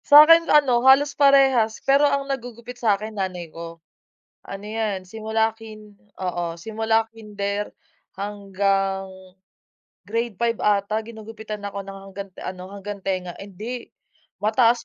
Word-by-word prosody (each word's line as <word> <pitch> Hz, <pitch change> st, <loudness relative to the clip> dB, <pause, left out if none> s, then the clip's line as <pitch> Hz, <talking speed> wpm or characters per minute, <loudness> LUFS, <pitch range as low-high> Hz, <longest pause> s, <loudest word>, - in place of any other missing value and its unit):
Sa'kin 325 Hz, +3 st, +8 dB
ano 265 Hz, -5 st, +5 dB
halos 280 Hz, +1 st, +5 dB
parehas 270 Hz, -6 st, +4 dB
pero 280 Hz, +2 st, +5 dB
ang 280 Hz, 0 st, 0 dB
naggugupit 245 Hz, -2 st, -6 dB
sa'kin 215 Hz, -1 st, +1 dB
nanay 180 Hz, -5 st, -4 dB
ko. 165 Hz, 0 st, -8 dB, 0.7 s
Ano 195 Hz, +1 st, -8 dB
'yan, 210 Hz, -3 st, -2 dB
simula 220 Hz, +2 st, -1 dB
kin 215 Hz, -2 st, -12 dB, 0.2 s
oo, 175 Hz, -2 st, -3 dB
simula 220 Hz, +4 st, 0 dB
kinder 205 Hz, -2 st, -4 dB, 0.5 s
hanggang 195 Hz, -1 st, -1 dB, 1.0 s
grade 230 Hz, 0 st, -2 dB
5 235 Hz, -1 st, +1 dB
ata 210 Hz, +1 st, +1 dB
ginugupitan 220 Hz, -2 st, -8 dB
ako 200 Hz, 0 st, -4 dB
ng 195 Hz, 0 st, -9 dB
hanggant 195 Hz, 0 st, -8 dB
ano, 185 Hz, 0 st, -6 dB
hanggang 200 Hz, 0 st, -6 dB
tenga 185 Hz, -2 st, -2 dB
ay 195 Hz, -, -8 dB
hindi 230 Hz, +6 st, -6 dB, 0.5 s
mataas 230 Hz, +3 st, +3 dB
215 Hz, 125 wpm, -23 LUFS, 195-235 Hz, 1.0 s, Sa'kin